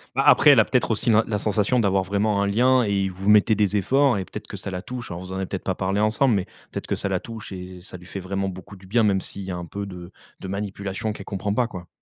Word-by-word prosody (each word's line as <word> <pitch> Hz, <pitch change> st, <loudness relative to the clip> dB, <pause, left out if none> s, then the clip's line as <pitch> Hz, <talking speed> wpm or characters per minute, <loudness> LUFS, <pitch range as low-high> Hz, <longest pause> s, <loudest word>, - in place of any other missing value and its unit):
Bah, -, -, +2 dB
après, -, -, +8 dB
elle -, -, +6 dB
a -, -, +5 dB
peut-être -, -, +1 dB
aussi -, -, 0 dB
l'in 110 Hz, 0 st, +5 dB
la 105 Hz, -2 st, -1 dB
sensation 105 Hz, +4 st, +1 dB
d'avoir 95 Hz, -3 st, +2 dB
vraiment 100 Hz, +2 st, 0 dB
un -, -, +1 dB
lien 125 Hz, +5 st, +3 dB
et 100 Hz, -2 st, 0 dB
vous 95 Hz, +3 st, 0 dB
mettez 105 Hz, +1 st, +5 dB
des 105 Hz, 0 st, +1 dB
efforts. 135 Hz, +5 st, +3 dB
Et 95 Hz, -, -4 dB
peut-être -, -, -8 dB
que -, -, -8 dB
ça -, -, -6 dB
la 90 Hz, 0 st, -5 dB
touche. 125 Hz, +1 st, -6 dB
Alors, 85 Hz, +1 st, -6 dB
vous 95 Hz, -, -9 dB
en 95 Hz, -, -4 dB
avez 95 Hz, -, -3 dB
peut-être 95 Hz, -, -5 dB
pas 95 Hz, -, 0 dB
parlé 95 Hz, +1 st, -1 dB
ensemble, 110 Hz, +3 st, +3 dB
mais 95 Hz, -, 0 dB, 0.3 s
peut-être -, -, -5 dB
que -, -, -1 dB
ça 100 Hz, -, -2 dB
la 95 Hz, -, 0 dB
touche 115 Hz, 0 st, -9 dB
et 90 Hz, -1 st, -8 dB
ça 90 Hz, -, -10 dB
lui 90 Hz, -, -15 dB
fait 95 Hz, -, -6 dB
vraiment 95 Hz, +1 st, -2 dB
beaucoup 95 Hz, +1 st, -8 dB
du 95 Hz, 0 st, -16 dB
bien, 115 Hz, +5 st, +2 dB
même 100 Hz, -3 st, +2 dB
s'il 100 Hz, -, -7 dB
y 95 Hz, -, -7 dB
a -, -, -3 dB
un 85 Hz, -, -6 dB
peu 100 Hz, +3 st, -6 dB
de 90 Hz, -1 st, -9 dB, 0.3 s
de -, -, -7 dB
manipulation 100 Hz, +1 st, -3 dB
qu'elle 100 Hz, -, -9 dB
comprend 100 Hz, 0 st, -2 dB
pas, 125 Hz, 0 st, +2 dB
quoi. 90 Hz, -6 st, -9 dB
100 Hz, 295 wpm, -24 LUFS, 95-105 Hz, 0.3 s, après